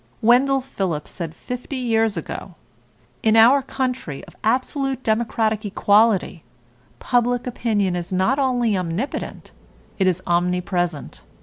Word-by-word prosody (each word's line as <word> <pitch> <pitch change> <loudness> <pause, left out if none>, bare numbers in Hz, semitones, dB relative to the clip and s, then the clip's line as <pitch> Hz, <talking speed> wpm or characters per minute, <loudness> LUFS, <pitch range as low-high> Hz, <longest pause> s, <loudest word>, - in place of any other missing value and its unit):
Wendell 265 +4 +4
Phillips 190 - -4
said 165 -3 -6
fifty 250 - -6
years 225 -5 +1
ago: 170 +2 -6 0.7
"In 220 0 +3
our 240 +5 +7
country 255 - -4
of - - -17
absolute 260 +3 0
democratic 220 -1 0
equality, 205 -3 +2 0.5
public 245 0 0
opinion 215 -6 0
is 175 +2 -5
not 190 +9 +1
only 245 -5 +1
omnipotent, 185 - -4 0.5
it 190 - +3
is 185 0 0
omnipresent. 175 -2 -1
220 Hz, 115 wpm, -22 LUFS, 180-250 Hz, 0.7 s, our